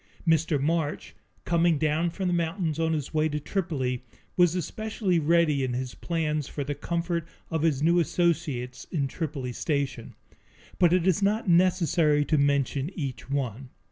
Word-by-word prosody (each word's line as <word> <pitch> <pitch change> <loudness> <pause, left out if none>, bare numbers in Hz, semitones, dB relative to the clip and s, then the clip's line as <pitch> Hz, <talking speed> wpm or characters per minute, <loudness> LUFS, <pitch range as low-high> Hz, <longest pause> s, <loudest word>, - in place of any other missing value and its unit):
Mr. 160 -2 +3
March, 155 +1 -1 0.3
coming 170 -1 +3
down 155 +3 +1
from 185 +2 -3
the 180 - +1
mountains 165 -1 -1
on 160 0 +1
his 150 -2 -3
way 155 0 +2
to 150 0 -2
Tripoli, 145 -8 -2 0.3
was 175 -1 +4
especially 200 -1 -1
ready 155 -3 +3
in 130 -1 -1
his 125 0 -3
plans 155 -4 -2
for 145 - -4
the 145 +1 -3
comfort 170 +2 -2 0.2
of 160 -2 0
his 150 -3 +1
new 170 +2 +4
associates 140 -8 -1
in 145 -6 -1
Tripoli 135 -5 -4
Station. 140 -4 -2 0.6
But 175 -2 +5
it 180 -1 +3
is 190 +1 +2
not 210 +2 +1
necessary 170 -4 +3
to 155 -1 +2
mention 140 0 +1
each 135 -5 -5
one. 130 -2 -3
160 Hz, 160 wpm, -27 LUFS, 140-170 Hz, 0.6 s, But